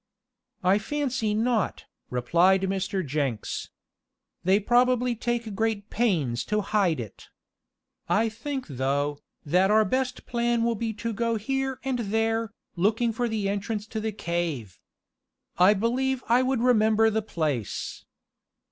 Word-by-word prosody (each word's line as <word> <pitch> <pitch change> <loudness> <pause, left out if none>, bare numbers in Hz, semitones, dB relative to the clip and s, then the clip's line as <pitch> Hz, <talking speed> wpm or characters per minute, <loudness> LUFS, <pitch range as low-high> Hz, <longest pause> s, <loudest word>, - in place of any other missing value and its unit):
"I 190 +3 +4
fancy 255 -3 -1
not," 225 -2 0 0.2
replied 170 +10 +3
Mr. 190 -1 -1
Jenks. 135 -6 -2 0.7
"They 190 +3 +4
probably 245 +2 +3
take 235 -1 -2
great 215 -1 -1
pains 160 - +1
to 210 0 0
hide 195 -7 +1
it. 110 -4 -9 0.8
I 220 +2 +3
think 260 +5 -4
though, 140 +1 -1 0.3
that 180 +6 +3
our 215 +1 +5
best 255 +4 -1
plan 235 -1 0
will 235 0 +2
be 225 +1 -2
to 230 +2 -4
go 230 +2 0
here 265 +4 -2
and 260 -2 -1
there, 225 +1 0 0.3
looking 225 +6 +1
for 240 +1 -1
the 215 -3 -1
entrance 205 +1 -2
to 220 - -3
the 220 0 -2
cave. 170 - -3 0.8
I 190 +4 +6
believe 255 +5 0
I 240 +2 +4
would 260 -2 0
remember 220 -2 +4
the 220 +1 0
place." 155 - -3
215 Hz, 135 wpm, -26 LUFS, 185-235 Hz, 0.8 s, I